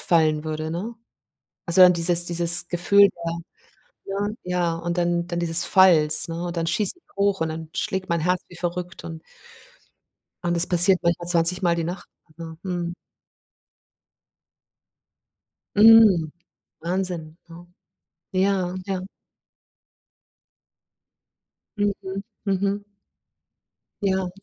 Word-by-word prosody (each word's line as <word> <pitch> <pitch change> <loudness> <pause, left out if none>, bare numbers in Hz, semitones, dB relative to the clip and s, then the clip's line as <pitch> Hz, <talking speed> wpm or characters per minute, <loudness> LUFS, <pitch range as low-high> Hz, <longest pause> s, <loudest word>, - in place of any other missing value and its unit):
fallen 155 -2 +1
würde, 155 0 -4
ne? 200 +8 -5 0.7
Also, 170 +2 +2
dann 180 0 +8
dieses 170 0 +2
dieses 175 0 +2
Gefühl 200 +3 +4 0.2
da, 165 - -2 0.7
ja, 200 +1 -3 0.2
ja, 180 -2 -1
und 170 +1 -4
dann 175 0 0
dann 175 -1 -3
dieses 165 0 0
Falls, 165 -4 +4
ne, 170 +1 -4
und 175 0 -6
dann 165 - -1
schieße 185 +4 0
ich - - -32
hoch 200 -2 +1
und 160 - 0
dann 160 0 -7
schlägt 190 -1 -3
meine 170 -2 -1
Herz 180 0 0
wie 175 - -14
verrückt 180 +1 -5
und 160 -1 -8 1.2
und 175 0 -1
das 170 +1 +4
passiert 180 +1 +4
manchmal 170 0 -1
20 170 +1 +1
Mal 170 -1 +2
die 165 - -2
Nacht, 175 +3 -6 0.3
ja, 165 -1 -8
mhm. 175 -2 -4 2.8
Mhm, 210 -7 +6 0.5
Wahnsinn, 170 -2 -4
ja. 170 +1 -13 0.7
Ja, 185 -1 0
ja. 190 -1 -4 2.7
Mhm, 200 -1 -3 0.2
mhm. 200 +1 -1 1.2
Ja. 190 -2 0
175 Hz, 120 wpm, -23 LUFS, 170-190 Hz, 2.8 s, dann